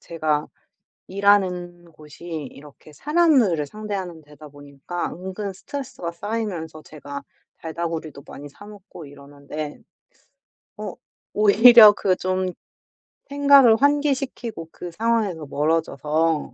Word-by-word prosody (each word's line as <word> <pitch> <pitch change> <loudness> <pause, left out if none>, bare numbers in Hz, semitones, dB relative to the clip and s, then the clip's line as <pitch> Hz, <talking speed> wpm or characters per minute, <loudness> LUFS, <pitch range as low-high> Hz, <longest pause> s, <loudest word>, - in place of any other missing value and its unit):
제가 155 -2 -2 0.6
일하는 180 -3 0
곳이 155 +1 -16
이렇게 150 -2 -9
사람들을 275 - +2
상대하는 190 -3 -6
데다 150 0 -15
보니까 145 +4 -7
은근 190 +3 -6
스트레스가 190 -5 -7
쌓이면서 175 -6 -5
제가 145 -2 -9 0.4
달달구리도 160 -3 -6
많이 145 - -10
사 145 +8 -15
먹고 200 -5 -12
이러는데 145 +1 -9 1.0
어 - - -6 0.4
오히려 215 +1 +8
그 190 -2 0
좀 185 0 -2 0.8
생각을 280 -4 +6
환기시키고 275 - -1
그 175 - -8
상황에서 210 -5 -1
멀어져서 155 +1 -1
175 Hz, 265 characters per minute, -22 LUFS, 155-210 Hz, 1.0 s, 오히려